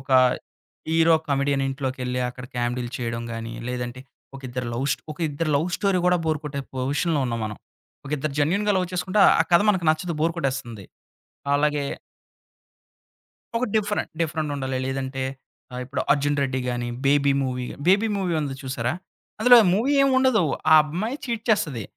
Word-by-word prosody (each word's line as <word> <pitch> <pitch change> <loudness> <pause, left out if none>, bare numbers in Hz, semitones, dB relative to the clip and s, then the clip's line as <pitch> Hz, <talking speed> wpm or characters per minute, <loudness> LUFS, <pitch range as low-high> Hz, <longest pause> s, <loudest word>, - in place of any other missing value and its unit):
ఒక 135 - -13 0.8
hero 165 0 +4
comedian 140 0 +1
అని - - 0
ఇంట్లోకెళ్ళి 130 -2 -3
అక్కడ 125 0 -10
కామెడీలు 120 0 -2
చేయడం 115 -1 -3
గాని, 115 0 -5 0.2
లేదంటే 125 0 -4 0.4
ఒక 135 - -11
ఇద్దరు 125 0 -4
లవ్ 130 +4 -1
స్ - - +2 0.2
ఒక 150 - -16
ఇద్దరు 155 +2 -2
లవ్ 160 +5 0
స్టోరీ 195 -2 +1
కూడా 180 - +4
బోర్ 155 -1 0
కొట్టే 140 -1 -4
పొజిషన్‌లో 145 +4 0
ఉన్నాం 115 -1 -2
మనం. 105 -1 -5 0.5
ఒక - - -8
ఇద్దరు 145 0 -3
జెన్యూన్‌గా 200 +8 +2
లవ్ 185 - +1
చేసుకుంటే 185 +4 0 0.2
ఆ - - +7
కథ 170 - +7
మనకు 185 -4 -1
నచ్చదు 160 +2 -2
బోర్ 165 +1 +2
కొట్టేస్తుంది. 130 - -3 0.7
అలాగే 145 0 +1 1.7
ఒక, 245 - -2
డిఫరెంట్. 210 -1 0
డిఫరెంట్ 155 -2 -1
ఉండాలి. 130 -1 -2
లేదంటే, 135 0 -3 0.5
ఆ! - - -7
ఇప్పుడు 135 +3 -3
'అర్జున్ 145 0 0
రెడ్డి' 130 -1 -1
గాని, 120 0 -2 0.2
'బేబీ' 140 0 +4
మూవీ 125 -1 -3 0.2
'బేబీ' 205 +4 +4
మూవీ 185 -3 -1
ఉంది 140 -2 -3
చూసారా? 130 0 -2 0.5
అందులో 245 +2 +8 0.2
మూవీ 255 +8 +1
ఏమి 275 - +4
ఉండదు. 260 -8 +3 0.3
ఆ - - +9
అమ్మాయి 205 - -3
చీట్ 230 -3 -3
చేస్తది. 150 - +1
145 Hz, 165 wpm, -24 LUFS, 130-175 Hz, 1.7 s, ఆ